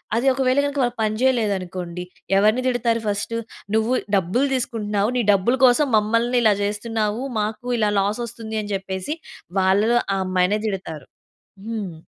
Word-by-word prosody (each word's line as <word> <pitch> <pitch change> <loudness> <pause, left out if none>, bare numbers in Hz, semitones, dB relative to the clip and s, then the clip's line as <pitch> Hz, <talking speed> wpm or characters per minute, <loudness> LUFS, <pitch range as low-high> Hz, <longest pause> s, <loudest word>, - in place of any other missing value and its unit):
అది 235 +3 0
ఒకవేళ 260 0 +1
గనక 285 0 -2
వాళ్ళు 245 -1 0
పని 215 -1 0
చేయలేదనుకోండి 185 -8 -1 0.3
ఎవరిని 215 +5 +3
తిడతారు 240 -2 +1
ఫస్ట్, 205 +2 -2 0.4
"నువ్వు 220 +3 +2 0.2
డబ్బులు 195 +9 +1
తీసుకుంటున్నావు. 215 -4 -1
నీ 245 - +2
డబ్బులు 205 +6 +2
కోసం 255 +4 +4
మమ్మల్ని 230 +4 +1
ఇలా 215 -2 +5
చేస్తున్నావు. 210 +2 -2 0.2
మాకు 215 +2 -3
ఇలా 210 -2 +2
లాస్ 205 +4 0
వస్తుంది" 220 -1 -6
అని 205 - -7
చెప్పేసి 190 +7 -4 0.4
వాళ్ళలో 205 +6 +3 0.2
ఆ - - -1
అమ్మాయినే 185 +3 +1
తిడతారు. 165 -8 -5 0.6
హ్మ్! 215 -6 -4
215 Hz, 145 wpm, -22 LUFS, 200-240 Hz, 0.6 s, ఇలా